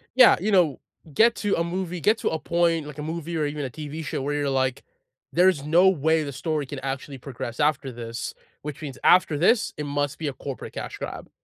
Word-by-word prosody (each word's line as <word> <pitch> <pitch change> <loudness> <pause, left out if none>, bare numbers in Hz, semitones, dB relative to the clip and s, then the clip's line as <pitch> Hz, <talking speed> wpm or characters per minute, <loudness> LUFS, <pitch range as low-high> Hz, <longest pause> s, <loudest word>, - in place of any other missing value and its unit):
Yeah. 255 -2 +8
You 210 +4 -1
know, 175 -8 +3 0.3
get 230 +8 +5
to 205 -1 0
a 165 - +1
movie 180 0 -3
get 215 +8 +3
to - - -1
a 160 - -2
point 170 -2 +1
like 150 -1 -9
a 150 - -5
movie 165 +1 -4
or 155 -2 0
even 145 -1 -3
a - - -4
TV 155 +4 -6
show 140 - -3
where 145 +2 -2
you're 145 -1 0
like, 130 -1 0 0.5
"There's 180 -5 +4
no 175 +5 +5
way 160 -2 +2
the 140 - -5
story 150 +2 -2
can 135 +1 -6
actually 135 +1 -5
progress 120 -3 -7
after 145 -2 +1
this, 115 -1 -6 0.3
which 150 0 -7
means 140 -4 -6
after 180 -4 +5
this, 210 +9 +3
it 150 - -3
must 145 0 -2
be 160 - -2
a 140 - -2
corporate 135 0 -7
cash - - -6
grab." - - -7
150 Hz, 225 wpm, -25 LUFS, 140-170 Hz, 0.5 s, Yeah